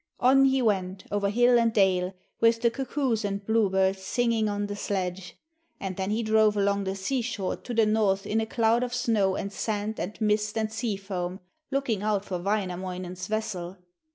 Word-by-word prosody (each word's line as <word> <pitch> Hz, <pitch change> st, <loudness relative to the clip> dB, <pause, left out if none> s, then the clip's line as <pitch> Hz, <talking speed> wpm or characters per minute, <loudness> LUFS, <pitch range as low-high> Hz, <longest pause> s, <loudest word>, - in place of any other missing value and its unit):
On 270 Hz, +2 st, +5 dB
he 265 Hz, -1 st, +3 dB
went, 190 Hz, -3 st, 0 dB
over 200 Hz, -1 st, +1 dB
hill 240 Hz, +3 st, +4 dB
and 230 Hz, -1 st, +3 dB
dale, 190 Hz, -3 st, +2 dB, 0.2 s
with 230 Hz, +1 st, +3 dB
the 235 Hz, -, +4 dB
cuckoos 260 Hz, -3 st, -1 dB
and 200 Hz, 0 st, -3 dB
blue 220 Hz, -2 st, +2 dB
birds 190 Hz, 0 st, +1 dB
singing 230 Hz, +1 st, +1 dB
on 205 Hz, 0 st, -1 dB
the 205 Hz, 0 st, -4 dB
sledge, 190 Hz, -2 st, -3 dB, 0.4 s
and 190 Hz, -1 st, -4 dB
then 190 Hz, +1 st, -2 dB
he 220 Hz, +2 st, 0 dB
drove 215 Hz, -1 st, +3 dB
along 200 Hz, 0 st, +1 dB
the 190 Hz, 0 st, -2 dB
seashore 220 Hz, -1 st, -2 dB
to 250 Hz, -, -9 dB
the 225 Hz, -2 st, +3 dB
north 210 Hz, -2 st, +1 dB
in 220 Hz, +2 st, 0 dB
a 220 Hz, -, -3 dB
cloud 230 Hz, +1 st, +2 dB
of 250 Hz, 0 st, -2 dB
snow 220 Hz, -6 st, +1 dB
and 200 Hz, +1 st, -4 dB
sand 215 Hz, 0 st, -2 dB
and 205 Hz, +4 st, -5 dB
mist 210 Hz, 0 st, +1 dB
and 220 Hz, 0 st, -1 dB
sea 220 Hz, -2 st, -2 dB
foam, 190 Hz, -2 st, -4 dB, 0.3 s
looking 270 Hz, -7 st, -1 dB
out 205 Hz, -1 st, 0 dB
for 180 Hz, -3 st, -3 dB
Wainamoinen's 185 Hz, -2 st, -3 dB
vessel. 195 Hz, -4 st, -3 dB
210 Hz, 185 wpm, -27 LUFS, 190-225 Hz, 0.4 s, On